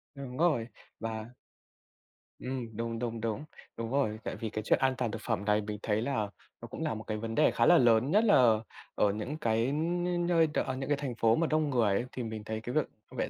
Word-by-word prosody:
Đúng 130 -2 -7
rồi. 150 -9 +2 0.3
Và 115 +1 -5 1.1
Ừm, 125 -4 -5
đúng, 115 0 -3
đúng, 115 -2 -3
đúng! 115 +6 -2 0.3
Đúng 115 0 -4
rồi. 110 -6 0
Tại - - -4
vì 110 - -4
cái 110 0 -4
chuyện - - +3
an 130 -1 +2
toàn 115 - -1
thực - - -6
phẩm 100 - -2
này 105 0 +3
mình 105 0 -5
thấy 105 0 +1
là 140 +4 -1 0.5
nó - - -7
cũng - - -6
là - - 0
một 110 0 -6
cái 110 -1 -3
vấn 115 +1 -4
đề - - +4
khá 115 - +2
là - - +7
lớn. 120 +3 +4
Nhất 215 +3 +5
là 125 - +5 0.4
ở 100 - +3
những 115 +9 -4
cái 115 -3 +1
những 175 +3 0
nơi 165 -2 +4
đ 150 - -5
ở 130 - -1
những 135 +2 -5
cái 145 - +2
thành 135 -4 -4
phố 115 -1 +3
mà 165 +4 +1
đông 155 -1 +1
người 120 -6 +2
ấy, 120 - 0
thì 125 - -4
mình 110 -1 -5
thấy 110 0 -4
cái 120 +2 -5
việc 155 - +3 0.3
vệ - - -1
115 Hz, 245 wpm, -30 LUFS, 110-140 Hz, 1.1 s, là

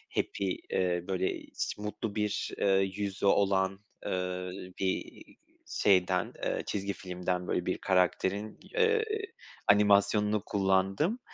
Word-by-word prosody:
happy 95 -2 -1
eee, 90 -2 +1
böyle 95 -1 -1
hiç - - -4
mutlu 105 +1 -4
bir, 105 -1 -1
eee, 100 - +2 0.3
yüzü 100 -1 -3
olan, 95 -1 +3 0.3
eee, 90 0 -2 0.3
bir 95 -1 -2 0.4
şeyden, 90 -2 +2
eee, - - -1
çizgi 100 0 -2
filmden 90 -1 -3
böyle 90 - 0
bir 90 - 0
karakterin, 95 +3 +1 0.2
eee, 455 -2 +3 0.6
animasyonunu 105 +1 +4
kullandım. 95 - +1
95 Hz, 110 wpm, -30 LUFS, 90-105 Hz, 0.6 s, animasyonunu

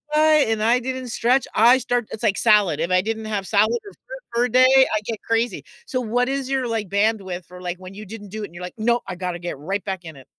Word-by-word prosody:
go - - +4
by, 310 0 +5 0.2
and 215 -1 0
I 235 +3 +4
didn't 255 0 -5
stretch, 240 +3 +2
I 235 +4 +6
start 245 -3 -1
it's 220 - -7
like 210 -3 +2
salad, 210 -8 +4
if 170 - -1
I 185 0 +4
didn't 220 +2 -4
have 205 -3 -3
salad 220 +3 +3
or 405 - -10
fruit - - -12
for 235 +1 +2
a - - -2
day, 255 +2 +6 0.3
I - - +2
get 225 -1 -5
crazy. 230 +1 -1 0.2
So 255 - -2
what 245 +2 0
is 270 -1 -2
your, 265 -2 0
like, 225 -4 -3
bandwidth 200 -3 -1
for, 180 +1 -13
like, 180 0 -4
when 185 +1 -11
you 210 +2 -9
didn't 210 +1 -9
do 215 +2 -6
it - - -4
and 170 - -20
you're 175 - -8
like, 180 - -6
"No, 235 +2 +1
I 180 - -5
gotta 180 -1 -4
get 175 -3 -5
right 195 +7 -3
back 190 -3 -4
in 160 -2 -9
it." 135 -1 -14
220 Hz, 275 wpm, -22 LUFS, 190-245 Hz, 0.3 s, I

